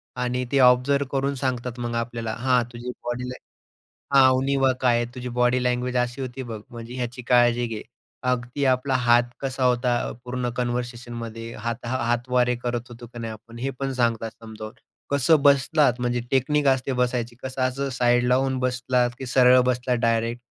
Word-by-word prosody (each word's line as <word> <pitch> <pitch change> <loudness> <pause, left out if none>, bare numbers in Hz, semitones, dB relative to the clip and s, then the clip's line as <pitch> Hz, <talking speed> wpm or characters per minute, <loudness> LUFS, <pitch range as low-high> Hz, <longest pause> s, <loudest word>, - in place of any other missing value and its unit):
आणि 125 0 -1
ते 140 - +3
ऑब्झर्व्ह 130 +2 +4
करून 140 0 0
सांगतात 125 -2 -3
मग 120 -1 -3
आपल्याला. 115 -1 -3
हां, 125 0 +3
तुझी 120 +1 -6
बॉडी 125 +1 -3
लॅ 125 - -6 0.8
हा, 135 -1 +8
उणिवा 135 0 +2
काय 125 -2 +3
आहे. 120 - -3
तुझी 125 -1 -5
बॉडी 125 +1 +1
लँग्वेज 125 0 0
अशी 125 +2 -5
होती. 130 +1 -5
बघ, 115 -3 -7
म्हणजे 120 +1 -9
ह्याची 125 0 -4
काळजी 120 -1 +4
घे. 110 -2 -5 0.5
अगदी 125 +3 -1
आपला 130 0 +2
हात 120 -1 +4 0.2
कसा 130 -1 -2
होता, 125 0 +2 0.3
पूर्ण 125 0 -3
कन्व्हर्सेशनमध्ये 120 -2 -4
हाता 115 +1 -4 0.2
हातवारे 125 +1 +1
करत 120 -1 -3
होतो 120 0 -11
की 120 +1 -12
नाही 115 -1 -4
आपण, 115 +2 -12
हे 135 +3 -2
पण 135 -1 -1
सांगतात 115 -3 0
समजावून. 110 +1 -9 0.4
कसं 140 +2 +4
बसलात, 140 -2 +3
म्हणजे 120 0 0
टेक्निक 145 +3 +2
असते 135 0 +1
बसायची. 120 -1 -1
कसं 130 0 -4
असं 135 +2 -1
साइड 120 0 +2
लावून 130 +1 +2
बसलात 125 -1 +1
की 130 - -6
सरळ 125 0 +6
बसलात, 125 0 +1
डायरेक्ट? 115 +1 0
125 Hz, 170 wpm, -24 LUFS, 120-130 Hz, 0.8 s, हा